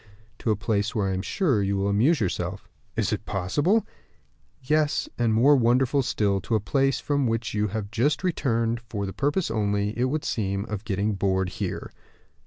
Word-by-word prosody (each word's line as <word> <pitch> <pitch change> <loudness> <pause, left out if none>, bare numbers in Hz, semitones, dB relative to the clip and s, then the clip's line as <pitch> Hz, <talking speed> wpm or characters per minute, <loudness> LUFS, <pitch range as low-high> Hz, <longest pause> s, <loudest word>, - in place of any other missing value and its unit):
"To - - -2
a 110 - +3
place 105 +1 -1
where 100 -3 +1
I - - -1
am 95 - -1
sure 140 - +1
you 100 0 0
will 100 +1 0
amuse 120 +11 +3
yourself." 95 -1 -3 0.3
"Is - - 0
it - - -4
possible?" 145 - +1 0.8
"Yes; 150 +2 +1
and 120 -2 +1
more 125 +7 +5
wonderful 130 +2 +3
still, 100 -6 0
to 115 - -1
a - - +3
place 135 +6 +1
from 140 -3 0
which 115 0 -1
you 105 0 +1
have 105 0 -4
just 135 - +1
returned 115 -9 0
for 115 -3 -5
the 95 - -5
purpose 145 +2 0
only, 105 -1 0
it 120 - +1
would 150 +4 -2
seem, 100 -2 -1
of 105 -1 -5
getting 105 0 0
bored 95 -1 0
here." - - -4
110 Hz, 190 wpm, -25 LUFS, 100-135 Hz, 0.8 s, more